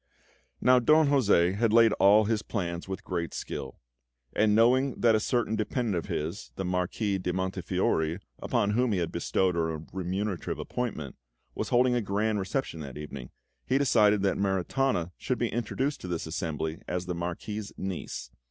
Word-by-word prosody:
Now 125 Hz, 0 st, +5 dB
Don 150 Hz, +4 st, +5 dB
José 100 Hz, -10 st, +4 dB
had 110 Hz, +2 st, +1 dB
laid 115 Hz, -1 st, +6 dB
all 105 Hz, +2 st, +6 dB
his 110 Hz, 0 st, 0 dB
plans 85 Hz, -6 st, -4 dB
with 95 Hz, 0 st, -5 dB
great 85 Hz, -3 st, -3 dB
skill; 65 Hz, -, -5 dB, 0.6 s
and 105 Hz, 0 st, +3 dB
knowing 125 Hz, +4 st, +3 dB
that 115 Hz, -1 st, +5 dB
a 110 Hz, -, +4 dB
certain 115 Hz, 0 st, 0 dB
dependent 110 Hz, 0 st, -1 dB
of 85 Hz, -, -3 dB
his, 85 Hz, +8 st, -4 dB
the 95 Hz, -, -3 dB
Marquis 90 Hz, +3 st, -1 dB
de 90 Hz, 0 st, -2 dB
Montefiori, 90 Hz, -3 st, 0 dB, 0.2 s
upon 105 Hz, -5 st, 0 dB
whom 120 Hz, +1 st, +2 dB
he -, -, +1 dB
had 85 Hz, -2 st, -1 dB
bestowed 95 Hz, -2 st, 0 dB
a 80 Hz, -2 st, -2 dB
remunerative 95 Hz, 0 st, -2 dB
appointment, 110 Hz, -, -4 dB, 0.4 s
was -, -, -3 dB
holding 125 Hz, +1 st, +4 dB
a 120 Hz, -, +1 dB
grand 105 Hz, +1 st, 0 dB
reception 95 Hz, -2 st, -3 dB
that 70 Hz, -3 st, -7 dB
evening, 70 Hz, -4 st, -7 dB, 0.3 s
he 130 Hz, -, +1 dB
decided 105 Hz, -7 st, +4 dB
that 100 Hz, -, +1 dB
Maritana 95 Hz, 0 st, 0 dB
should 130 Hz, -, -1 dB
be 120 Hz, -, 0 dB
introduced 130 Hz, +5 st, -2 dB
to -, -, -6 dB
this 85 Hz, -2 st, -3 dB
assembly 80 Hz, -1 st, -3 dB
as 90 Hz, 0 st, -2 dB
the 90 Hz, -, -3 dB
Marquis's 90 Hz, +5 st, -4 dB
niece. 90 Hz, -9 st, -5 dB
100 Hz, 170 wpm, -28 LUFS, 85-115 Hz, 0.6 s, laid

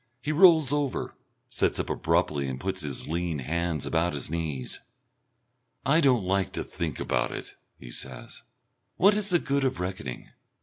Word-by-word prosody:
He 145 Hz, +4 st, -2 dB
rolls 160 Hz, -4 st, +6 dB
over, 145 Hz, -2 st, -1 dB, 0.3 s
sits -, -, +1 dB
up -, -, -1 dB
abruptly 70 Hz, -2 st, +1 dB
and 65 Hz, -1 st, -4 dB
puts 95 Hz, +1 st, -2 dB
his 75 Hz, -4 st, -3 dB
lean 85 Hz, 0 st, -1 dB
hands 80 Hz, +2 st, -1 dB
about 85 Hz, 0 st, +1 dB
his 70 Hz, +1 st, -3 dB
knees. 80 Hz, -6 st, -3 dB, 1.1 s
"I 150 Hz, +4 st, +4 dB
don't 125 Hz, -7 st, +4 dB
like 95 Hz, 0 st, +1 dB
to -, -, -2 dB
think 80 Hz, -6 st, -4 dB
about -, -, 0 dB
it," -, -, -7 dB, 0.2 s
he -, -, -11 dB
says. -, -, -6 dB, 0.6 s
"What 200 Hz, +3 st, +6 dB
is 210 Hz, -1 st, +1 dB
the 180 Hz, -, +5 dB
good 140 Hz, -3 st, 0 dB
of 130 Hz, -7 st, 0 dB
reckoning 90 Hz, -8 st, -5 dB
90 Hz, 165 wpm, -27 LUFS, -, 1.1 s, rolls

